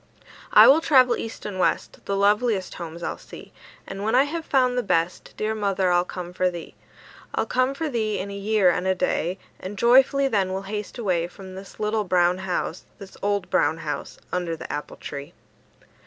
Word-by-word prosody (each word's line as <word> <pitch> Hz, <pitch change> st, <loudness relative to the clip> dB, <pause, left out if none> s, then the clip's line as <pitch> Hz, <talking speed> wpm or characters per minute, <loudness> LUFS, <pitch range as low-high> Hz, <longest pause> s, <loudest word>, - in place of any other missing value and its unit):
"I -, -, +9 dB
will 295 Hz, +4 st, +7 dB
travel 255 Hz, -6 st, +5 dB
east 225 Hz, -, -7 dB
and 200 Hz, -3 st, -5 dB
west; -, -, 0 dB
The 200 Hz, -, -1 dB
loveliest 205 Hz, 0 st, +2 dB
homes 170 Hz, 0 st, -8 dB
I'll -, -, -3 dB
see; -, -, -12 dB, 0.3 s
And 195 Hz, 0 st, -7 dB
when 220 Hz, +3 st, +1 dB
I 260 Hz, -, +6 dB
have 320 Hz, +3 st, -4 dB
found 255 Hz, -2 st, +2 dB
the 250 Hz, -, +1 dB
best, 170 Hz, -4 st, -1 dB
Dear 215 Hz, +1 st, -1 dB
mother, 195 Hz, -3 st, 0 dB
I'll 175 Hz, 0 st, +3 dB
come 180 Hz, -1 st, -7 dB
for 185 Hz, 0 st, +1 dB
thee. 170 Hz, -2 st, -8 dB, 0.6 s
I'll -, -, +1 dB
come 255 Hz, +2 st, +1 dB
for 320 Hz, +3 st, -2 dB
thee 220 Hz, -6 st, -1 dB
in 200 Hz, +1 st, -4 dB
a -, -, -6 dB
year 200 Hz, -2 st, +3 dB
and 180 Hz, +2 st, -2 dB
a 190 Hz, -, +2 dB
day, 180 Hz, 0 st, -1 dB, 0.2 s
And 200 Hz, +2 st, -7 dB
joyfully 265 Hz, +4 st, +5 dB
then 195 Hz, -6 st, 0 dB
we'll 190 Hz, +1 st, -3 dB
haste 210 Hz, +3 st, -5 dB
away 180 Hz, -7 st, 0 dB
From 185 Hz, +1 st, -11 dB
this 190 Hz, +1 st, -11 dB
little 215 Hz, 0 st, 0 dB
brown 180 Hz, -1 st, +2 dB
house, 185 Hz, -2 st, -3 dB
This 195 Hz, -1 st, -12 dB
old 200 Hz, -2 st, -1 dB
brown 160 Hz, -, +2 dB
house, 150 Hz, -3 st, -5 dB
Under 175 Hz, -2 st, -1 dB
the -, -, -7 dB
apple 150 Hz, -, -6 dB
tree." 140 Hz, +4 st, -8 dB
195 Hz, 200 wpm, -24 LUFS, 180-220 Hz, 0.6 s, I